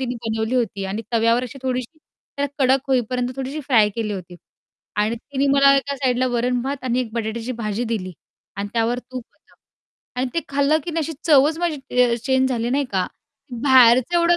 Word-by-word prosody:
तिने 250 Hz, -1 st, -2 dB
बनवली 220 Hz, +2 st, -1 dB
होती 210 Hz, -5 st, -1 dB
आणि 200 Hz, +4 st, -4 dB
तव्यावर 230 Hz, +2 st, +3 dB
अशी 255 Hz, +3 st, -9 dB
थोडीशी 255 Hz, +4 st, -3 dB, 0.4 s
त्याला 285 Hz, 0 st, -1 dB
कडक 265 Hz, 0 st, +3 dB
होईपर्यंत 250 Hz, -1 st, 0 dB
थोडीशी 270 Hz, +3 st, -4 dB
फ्राय 235 Hz, -7 st, +3 dB
केली 220 Hz, -2 st, -2 dB
होती 180 Hz, -2 st, -7 dB, 0.6 s
आणि 210 Hz, +3 st, +1 dB
तिने 275 Hz, +3 st, -2 dB
मला 275 Hz, 0 st, +6 dB
एका 280 Hz, +1 st, -2 dB
साईडला 255 Hz, -2 st, +1 dB
वरण-भात 250 Hz, +3 st, -1 dB
आणि 250 Hz, 0 st, +1 dB
एक 230 Hz, -3 st, -5 dB
बटाट्याची 230 Hz, +1 st, -3 dB
भाजी 215 Hz, +3 st, -2 dB
दिली 200 Hz, -5 st, -3 dB, 0.4 s
आणि 200 Hz, +1 st, -3 dB
त्यावर 235 Hz, +1 st, 0 dB
तूप 250 Hz, 0 st, -8 dB
होतं. -, -, -29 dB, 0.7 s
आणि 260 Hz, -, 0 dB
ते 335 Hz, -, +1 dB
खाल्लं 280 Hz, +2 st, +2 dB
की 345 Hz, -, -4 dB
नाही 330 Hz, -, -1 dB
अशी 325 Hz, -, -4 dB
चवच 305 Hz, 0 st, +4 dB
माझी 340 Hz, -3 st, -1 dB
च 250 Hz, -3 st, +1 dB
अ, -, -, +3 dB
चेंज 260 Hz, 0 st, +2 dB
झाली, 240 Hz, -1 st, -1 dB
नाही 280 Hz, +2 st, +1 dB
का. 185 Hz, -1 st, +1 dB, 0.6 s
बाहेरचं 255 Hz, +2 st, +5 dB
एवढं 340 Hz, 0 st, +4 dB
250 Hz, 190 wpm, -21 LUFS, 230-275 Hz, 0.7 s, मला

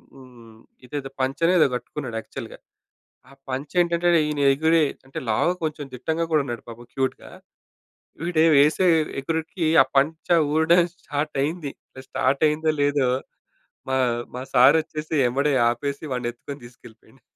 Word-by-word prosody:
హ్మ్. 120 Hz, -4 st, -16 dB, 0.3 s
ఇదేదో 135 Hz, +1 st, -5 dB
పంచనో 145 Hz, +6 st, +1 dB
ఏదో -, -, +6 dB
గట్టుకున్నాడు 125 Hz, -2 st, -6 dB
యాక్చువల్‌గా. -, -, -9 dB, 0.7 s
ఆ -, -, -16 dB, 0.2 s
పంచా 135 Hz, +6 st, -5 dB
ఏంటంటేనీ 170 Hz, 0 st, +2 dB
ఈని 145 Hz, -1 st, -2 dB
ఎగిరే 160 Hz, +3 st, +3 dB, 0.2 s
అంటే 135 Hz, -, -7 dB
లావు 110 Hz, +11 st, +2 dB
కొంచెం 150 Hz, -2 st, -3 dB
దిట్టంగా 160 Hz, +6 st, -2 dB
కూడా 155 Hz, -, +4 dB
ఉన్నాడు 120 Hz, -3 st, -5 dB
పాపం 120 Hz, +1 st, -11 dB
క్యూట్‌గా. 130 Hz, -1 st, -3 dB, 0.9 s
వీడు 170 Hz, -2 st, +1 dB
వేసే 150 Hz, +6 st, +4 dB, 0.3 s
ఎగురిడికి 160 Hz, +4 st, -3 dB, 0.2 s
ఆ -, -, -3 dB
పంచ 155 Hz, +4 st, +1 dB, 0.3 s
ఊడడం 160 Hz, +3 st, +4 dB
స్టార్ట్ 150 Hz, -2 st, -4 dB
అయింది. 155 Hz, 0 st, -3 dB, 0.4 s
స్టార్ట్ 135 Hz, +3 st, 0 dB
అయిందో 155 Hz, +1 st, 0 dB
లేదో 145 Hz, -2 st, +2 dB, 0.8 s
మా 130 Hz, -, 0 dB, 0.4 s
మా 125 Hz, -, -5 dB
సార్ 130 Hz, +4 st, +7 dB
వచ్చేసి 155 Hz, 0 st, -6 dB
ఎంబడే 140 Hz, +4 st, 0 dB, 0.2 s
ఆపేసి 140 Hz, +5 st, -3 dB
వాడిని 125 Hz, -1 st, -2 dB
ఎత్తుకొని 140 Hz, +3 st, -10 dB
తీసుకెళ్ళిపోయిండు. 120 Hz, +1 st, -17 dB
145 Hz, 135 wpm, -23 LUFS, 130-160 Hz, 0.9 s, సార్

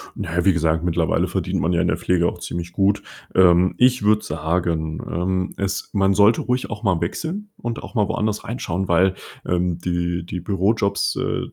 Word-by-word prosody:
Na 85 Hz, -, -5 dB
ja, 90 Hz, -, +1 dB
wie 95 Hz, -, +5 dB
gesagt, 80 Hz, -1 st, +1 dB
mittlerweile 85 Hz, -2 st, +1 dB
verdient -, -, -2 dB
man 85 Hz, +4 st, +1 dB
ja 85 Hz, -, +2 dB
in 90 Hz, -, +1 dB
der 85 Hz, -, +1 dB
Pflege 85 Hz, 0 st, +1 dB
auch 90 Hz, -, -4 dB
ziemlich 85 Hz, 0 st, -5 dB
gut. 100 Hz, +2 st, +2 dB, 0.3 s
Ähm, 90 Hz, 0 st, +5 dB
ich 125 Hz, -2 st, +3 dB
würde 105 Hz, +1 st, +3 dB
sagen, 80 Hz, 0 st, -1 dB
ähm, 90 Hz, +2 st, -1 dB
es 100 Hz, -1 st, -2 dB
man 95 Hz, -1 st, +3 dB
sollte 105 Hz, +3 st, +4 dB
ruhig 125 Hz, 0 st, -1 dB
auch 105 Hz, -1 st, -6 dB
mal 95 Hz, -6 st, +2 dB
wechseln 170 Hz, -, -3 dB
und 120 Hz, -1 st, -5 dB
auch -, -, -10 dB
mal 105 Hz, -3 st, +2 dB
woanders 105 Hz, +1 st, -1 dB
reinschauen, 95 Hz, -6 st, -3 dB
weil, 95 Hz, +2 st, +3 dB, 0.3 s
ähm, 90 Hz, -1 st, 0 dB
die 85 Hz, -1 st, -2 dB
die 90 Hz, -, -5 dB
Bürojobs, 100 Hz, +3 st, 0 dB
äh, -, -, -1 dB
90 Hz, 195 wpm, -22 LUFS, 85-105 Hz, 0.3 s, wie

